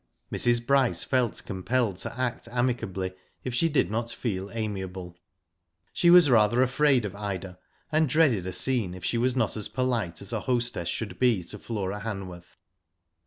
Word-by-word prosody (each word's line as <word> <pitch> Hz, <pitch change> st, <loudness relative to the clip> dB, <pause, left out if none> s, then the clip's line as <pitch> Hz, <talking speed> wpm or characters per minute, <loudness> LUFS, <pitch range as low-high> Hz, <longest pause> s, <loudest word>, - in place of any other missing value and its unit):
Mrs. 120 Hz, 0 st, +2 dB
Bryce 135 Hz, -2 st, +3 dB
felt 125 Hz, -4 st, 0 dB
compelled 100 Hz, +2 st, -1 dB
to 115 Hz, +6 st, -4 dB
act 125 Hz, -2 st, -2 dB
amicably 120 Hz, -7 st, -1 dB, 0.3 s
if 130 Hz, -, -4 dB
she 165 Hz, +7 st, +2 dB
did 145 Hz, -8 st, +1 dB
not 115 Hz, +2 st, -1 dB
feel 100 Hz, -6 st, -3 dB
amiable. 95 Hz, -5 st, -5 dB, 0.8 s
She 175 Hz, -, +3 dB
was 175 Hz, -2 st, +8 dB
rather 120 Hz, 0 st, +4 dB
afraid 130 Hz, -2 st, +2 dB
of 100 Hz, -, -4 dB
Ida, 95 Hz, -3 st, -5 dB, 0.3 s
and 155 Hz, -1 st, +2 dB
dreaded 125 Hz, -, +3 dB
a -, -, -2 dB
scene 110 Hz, -3 st, 0 dB
if 95 Hz, -, -8 dB
she 115 Hz, -, 0 dB
was 125 Hz, +1 st, +1 dB
not 115 Hz, -4 st, 0 dB
as 105 Hz, -2 st, 0 dB
polite 120 Hz, -10 st, -1 dB
as 100 Hz, +3 st, -5 dB
a 110 Hz, -, 0 dB
hostess 120 Hz, -5 st, -1 dB
should 110 Hz, +4 st, -4 dB
be 120 Hz, -8 st, +3 dB
to 105 Hz, -, -8 dB
Flora 100 Hz, -3 st, -4 dB
Hanworth. 95 Hz, -5 st, -7 dB
115 Hz, 165 wpm, -27 LUFS, 95-125 Hz, 0.8 s, was